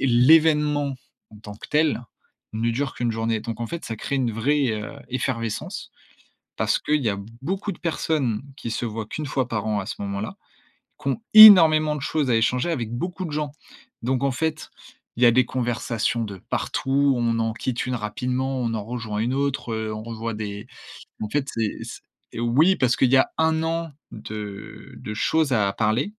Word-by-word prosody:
l'événement, 150 +2 +4 0.4
en 105 - -14
tant 105 -1 -10
que - - -12
tel, 150 -5 +1 0.5
ne 115 +1 0
dure 135 +4 -2
qu'1 120 -1 -1
journée. 115 -1 -1
Donc 115 +1 -6
en 115 - -2
fait, 170 +6 -6
ça 115 - -4
crée 140 - -3
une 125 -4 0
vraie, 135 +4 +1
heu, 105 +3 -5 0.2
effervescence 115 -3 -3 0.7
parce - - +2
qu'il 150 0 0
y 110 - +2
a 100 - -2 0.2
beaucoup 190 +7 -3
de - - -10
personnes 145 -8 -1
qui 115 - -5
se 120 - -2
voient 110 -1 -4
qu'1 155 +6 -5
fois 130 -2 -1
par 110 -3 -3
an, 105 -1 0
à 95 - -5
ce 115 - -5
moment-là, 100 +2 -4 0.7
qui 140 - -2
ont 135 - -1
énormément 160 -8 +9
de - - -6
choses 140 -1 -1
à 115 - +4
échanger 125 +7 +1
avec 120 -9 -3
beaucoup 180 +9 -4
de 160 - -5
gens. 150 -1 -2 0.5
Donc 130 +2 0
en 140 - +2
fait, 155 +4 -3 0.5
il 120 - -4
y - - +8
a 120 - +7
des 130 +2 +4
conversations 120 -2 -1
de 100 -2 -7
partout. 140 +1 +1
On 115 -1 +1
en 115 0 0
quitte 125 +1 -3
une 125 -1 -1
rapidement, 125 +5 -2
on 115 -2 -1
en 105 -2 -3
rejoint 115 -3 -4
une 120 +4 0
autre, 140 -4 -1
heu, 110 -1 -3
on 110 - -6
revoit 115 -1 -5
des 105 -1 -6 0.6
en 105 - -3
fait, 140 +3 -1
c'est 110 -2 -2 0.5
c'est - - -7
oui, 145 +11 +4
parce 125 -5 +2
qu'il 130 -1 +2
y 135 - +6
a 130 - +3
1 160 0 +2
an 165 0 -2 0.2
de 105 -2 -8
de 105 - -6
choses 155 +5 +1
à 100 -4 +2
parler. 110 - +1
125 Hz, 195 wpm, -23 LUFS, 110-145 Hz, 0.7 s, énormément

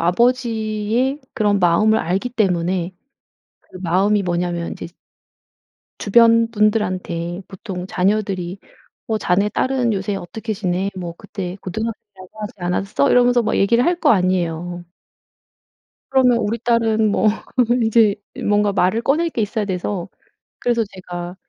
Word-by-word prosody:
아버지의 230 - +1
그런 205 -2 +2
마음을 195 +5 +3
알기 190 +8 -1
때문에 185 -5 0 0.7
그 185 - -14
마음이 195 +4 +2
뭐냐면 175 -1 -2
이제 - - -7 1.1
주변 230 +2 +4
분들한테 185 -5 -1
보통 190 -2 -7
자녀들이 195 -1 -1 0.5
어 220 -1 -1
"자네 200 +3 +1
딸은 255 +1 0
요새 200 0 -2
어떻게 220 +5 -5
지내? 190 0 -1
뭐 175 -2 -5
그때 190 -2 -6
고등학생이라고 205 -1 -6
하지 210 - -5
않았어?" 175 -4 0
이러면서 245 0 +4
막 220 - 0
얘기를 235 +5 +3
할 345 +2 +1
거 300 - +4
아니에요. 175 -3 0 1.3
그러면 255 -3 +4
우리 230 0 -1
딸은 225 -2 +2
뭐 215 - +3 0.6
이제 220 -2 +4 0.3
뭔가 205 0 +2
말을 195 +4 +1
꺼낼 310 +7 +2
게 240 - -3
있어야 215 +1 -1
돼서, 185 -1 -3 0.5
그래서 235 -1 +1
제가 175 -2 -7
205 Hz, 290 characters per minute, -20 LUFS, 180-230 Hz, 1.3 s, 주변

